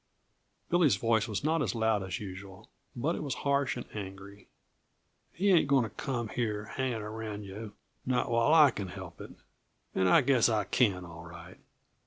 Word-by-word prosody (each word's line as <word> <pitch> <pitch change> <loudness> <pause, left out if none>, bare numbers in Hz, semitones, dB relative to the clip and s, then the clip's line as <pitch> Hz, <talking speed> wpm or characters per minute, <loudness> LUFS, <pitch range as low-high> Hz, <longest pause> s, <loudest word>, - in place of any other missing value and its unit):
Billy's 165 - +4
voice 115 +2 +1
was 105 +1 -3
not 160 +1 +1
as 135 - -1
loud 110 -2 +1
as 95 -2 -4
usual, 95 0 -9 0.3
but 145 +8 0
it - - -5
was 140 -4 -3
harsh 140 -2 +1
and 120 - -6
angry. 100 0 -8 0.8
"He 200 +3 +1
ain't 165 -5 +5
going 140 -3 +4
to 110 - -5
come 120 -2 -3
here 105 -3 -2
hanging 125 -2 -3
around 105 -1 -6
you 100 +2 -8 0.3
not 125 -1 0
while 115 +5 +3
I 155 -4 +7
can 100 -3 -5
help 90 - -9
it, - - -8 0.6
and 95 -1 +2
I - - +6
guess 130 -4 +3
I 110 -2 +1
can, 95 -2 +1
all 80 -1 -10
right!" 85 +1 -12
110 Hz, 180 wpm, -30 LUFS, 100-130 Hz, 0.8 s, I